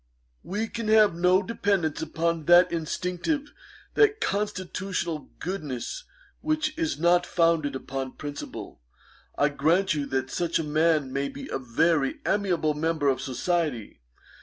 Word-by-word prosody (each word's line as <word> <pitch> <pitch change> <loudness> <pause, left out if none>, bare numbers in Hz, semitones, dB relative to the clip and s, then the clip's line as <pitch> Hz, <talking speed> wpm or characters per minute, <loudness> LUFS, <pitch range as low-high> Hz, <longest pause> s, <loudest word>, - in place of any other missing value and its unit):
'We 215 +4 -3
can 230 -2 -4
have 215 -3 +5
no 180 +3 +3
dependance 195 -7 0
upon 165 0 -1
that 175 +1 +6
instinctive, 180 - -2 0.4
that 430 0 +4
constitutional 190 - -2
goodness 175 - -5 0.3
which 310 0 -1
is 325 -1 -1
not 175 +2 +4
founded 165 -5 +1
upon 130 0 -5
principle. 145 - -7 0.6
I 145 - +3
grant 160 +7 +2
you 145 -2 -2
that 130 0 -2
such 170 -1 0
a 165 - -1
man 155 -2 +1
may 140 0 -1
be 140 - -8
a - - -2
very 135 +3 +1
amiable 180 -6 +1
member 155 -1 0
of 130 - 0
society. 135 - -2
170 Hz, 135 wpm, -26 LUFS, 145-195 Hz, 0.6 s, that